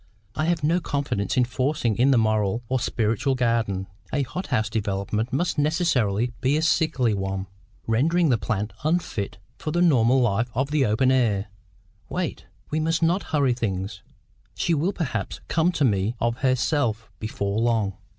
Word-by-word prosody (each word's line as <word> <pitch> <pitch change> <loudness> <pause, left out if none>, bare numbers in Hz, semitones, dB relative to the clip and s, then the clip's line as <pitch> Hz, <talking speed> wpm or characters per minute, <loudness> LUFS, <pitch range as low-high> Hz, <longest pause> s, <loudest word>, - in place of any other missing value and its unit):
I 155 - -1
have 170 -2 0
no 165 +4 +3
confidence 140 - -2
in 125 - +5
FORCING 125 -2 0
in 130 +3 +5
the 135 - +5
moral 110 0 +1
or 130 0 +1
spiritual 115 +3 0
garden. 115 -6 0 0.3
A 140 - +1
hothouse 130 - -2
development 105 +1 -2
must 165 +3 0
necessarily 125 - +1
be 135 +4 +2
a 155 - 0
sickly 155 -8 +2
one, 95 -1 -2 0.4
rendering 160 +9 +2
the 120 -4 +2
plant 105 +2 -2
unfit 155 - -1 0.2
for - - -4
the 170 +3 0
normal 130 -6 +4
life 120 0 +1
of 135 +4 0
the 150 -5 +2
open 120 +5 +3
air. 110 -6 +1 0.6
Wait. 175 - -3 0.2
We 155 - +1
must 165 +1 0
not 175 +4 +2
hurry 140 -5 +2
things. 100 -5 -3 0.5
She 170 - 0
will 165 +5 +1
perhaps 165 -9 -3
come 165 +3 +2
to 145 - +2
me 105 0 +1
of 115 0 0
herself 130 -3 0
before 100 -1 -2
long. 115 -4 +1
125 Hz, 160 wpm, -24 LUFS, 110-150 Hz, 0.6 s, in